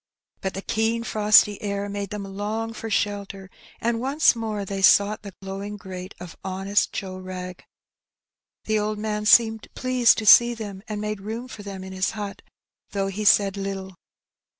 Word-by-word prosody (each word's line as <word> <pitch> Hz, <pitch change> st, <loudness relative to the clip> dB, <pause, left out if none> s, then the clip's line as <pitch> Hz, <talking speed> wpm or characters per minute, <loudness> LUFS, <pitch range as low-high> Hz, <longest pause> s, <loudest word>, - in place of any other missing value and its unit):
But 190 Hz, -, -3 dB
the 195 Hz, -, -5 dB
keen 225 Hz, +1 st, 0 dB
frosty 210 Hz, -2 st, +4 dB
air 200 Hz, -1 st, -3 dB
made 200 Hz, -1 st, -4 dB
them 210 Hz, -1 st, -5 dB
long 210 Hz, +3 st, -4 dB
for 225 Hz, 0 st, -6 dB
shelter, 200 Hz, -2 st, -2 dB, 0.3 s
and 230 Hz, 0 st, 0 dB
once 275 Hz, +2 st, +3 dB
more 215 Hz, -3 st, -3 dB
they 195 Hz, 0 st, -4 dB
sought 205 Hz, +2 st, +5 dB
the 200 Hz, -3 st, -10 dB
glowing 200 Hz, +2 st, -6 dB
grate 185 Hz, -1 st, -8 dB
of 175 Hz, -2 st, -9 dB
honest 195 Hz, +2 st, 0 dB
Joe 185 Hz, -1 st, -5 dB
Wrag. 185 Hz, -1 st, -7 dB, 1.0 s
The 215 Hz, 0 st, +1 dB
old 210 Hz, 0 st, -2 dB
man 210 Hz, 0 st, -2 dB
seemed 225 Hz, -1 st, +5 dB
pleased 255 Hz, -2 st, +3 dB
to 220 Hz, -, -3 dB
see 240 Hz, +3 st, +8 dB
them, 205 Hz, -4 st, -7 dB
and 215 Hz, -2 st, -4 dB
made 210 Hz, -1 st, -4 dB
room 225 Hz, +5 st, -5 dB
for 220 Hz, -, -10 dB
them 195 Hz, -2 st, -7 dB
in 190 Hz, 0 st, -8 dB
his 185 Hz, 0 st, 0 dB
hut, 205 Hz, -1 st, -6 dB, 0.5 s
though 195 Hz, -1 st, -1 dB
he 205 Hz, +2 st, -4 dB
said 200 Hz, -2 st, +5 dB
Httle. 195 Hz, -1 st, -5 dB
205 Hz, 175 wpm, -24 LUFS, 195-220 Hz, 1.0 s, see